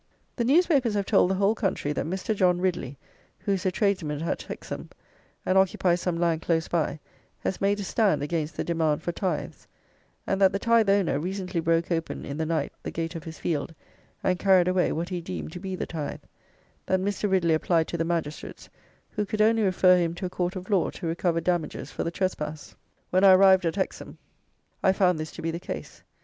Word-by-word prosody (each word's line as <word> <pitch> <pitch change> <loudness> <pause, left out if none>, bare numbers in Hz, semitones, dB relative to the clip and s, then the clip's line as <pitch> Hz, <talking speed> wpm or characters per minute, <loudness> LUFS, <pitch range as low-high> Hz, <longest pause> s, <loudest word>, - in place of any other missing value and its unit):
The 235 - 0
newspapers 275 - +3
have 200 -1 0
told 195 -3 +4
the 190 - +1
whole 200 +2 +3
country 190 -9 -1
that - - -2
Mr. 190 +5 -2
John 180 -2 +3
Ridley, 175 -8 -2 0.4
who 200 - -3
is 195 -1 0
a - - +2
tradesman 180 -7 0
at 170 - -2
Hexham, - - -7 0.6
and 190 +1 +4
occupies 180 -2 +2
some 175 -2 -1
land 165 -2 +1
close 165 -1 0
by, 160 -2 -1 0.4
has 190 - -3
made 200 +1 +2
a - - -3
stand 190 -7 +1
against 155 0 -2
the - - -1
demand 160 -2 0
for 175 - -1
tithes; 175 -3 -4 0.6
and 195 0 -1
that 190 -1 +5
the - - +1
tithe 230 0 +3
owner 195 -7 +2
recently 185 +1 -3
broke 165 +1 +1
open, 165 -1 -2
in 140 - -5
the 160 0 -1
night, 160 -3 -1
the - - -5
gate 165 +1 -4
of 165 -3 -7
his 160 -1 -8
field, 160 0 -2 0.5
and 180 -1 +1
carried 190 -3 +4
away 185 0 +2
what 170 +2 -3
he 180 -2 -3
deemed 80 - -6
to - - -7
be 190 0 -4
the - - -3
tithe; 155 -4 -5 0.6
that 185 - +2
Mr. 200 +2 -1
Ridley 175 -4 +3
applied 160 +1 +2
to 170 - -3
the - - +2
magistrates, 165 -3 -4 0.4
who 210 - -1
could 210 +1 -4
only 225 +1 +4
refer 185 -2 +4
him 170 -1 -1
to 185 - -5
a 180 - -4
court 180 +1 -2
of 185 +2 -7
law 190 -4 +3
to - - -8
recover 165 0 0
damages 175 -3 -2
for - - -3
the - - -1
trespass. 155 -5 -4 0.4
When 185 +2 +3
I 195 -1 +9
arrived 190 -1 +6
at 165 - -1
Hexham, 190 - -4 0.6
I 190 - +4
found 180 -4 +2
this 155 0 -5
to - - -8
be 165 - -1
the 170 - -4
case. - - -7
180 Hz, 215 wpm, -26 LUFS, 165-195 Hz, 0.6 s, I